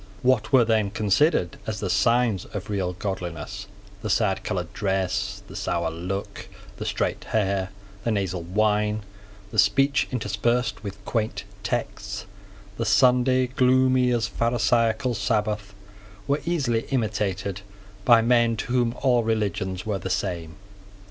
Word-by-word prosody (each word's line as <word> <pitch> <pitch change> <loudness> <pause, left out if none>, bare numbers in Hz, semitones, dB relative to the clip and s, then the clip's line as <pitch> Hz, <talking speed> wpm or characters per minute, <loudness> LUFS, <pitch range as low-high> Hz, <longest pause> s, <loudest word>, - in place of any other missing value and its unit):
What 125 -3 +2
were 130 -4 +6
then 110 -3 +2
considered 105 - +1
as 105 -2 -3
the 100 - -2
signs 110 +1 +2
of 105 0 -6
real 95 -3 -1
godliness, 95 0 -5 0.3
the 110 - -4
sadcoloured 95 -4 0
dress, 95 -4 -1
the - - -11
sour 85 -1 -1
look, 90 +4 -5 0.3
the - - -5
straight - - -1
hair, 100 -3 0 0.3
the 115 - 0
nasal 95 -5 -1
whine, 105 +3 +1 0.5
the 110 - 0
speech 135 +9 +3
interspersed 120 +1 -1
with 100 -1 -8
quaint 110 -2 -2 0.2
texts, - - -3 0.5
the 115 - -1
Sunday, 125 +2 +4
gloomy 130 0 +3
as 120 -3 +1
a - - -13
Pharisaical 115 +1 +1
Sabbath, 105 -1 -1 0.5
were 145 +1 +1
easily 130 -10 0
imitated 100 -6 -1 0.4
by 115 +1 +6
men 120 -1 +3
to 120 - -3
whom 120 -1 +2
all 125 -3 +4
religions 100 -4 -1
were 105 -3 -1
the 95 - -5
same. 85 -4 -2
105 Hz, 135 wpm, -25 LUFS, 95-120 Hz, 0.5 s, were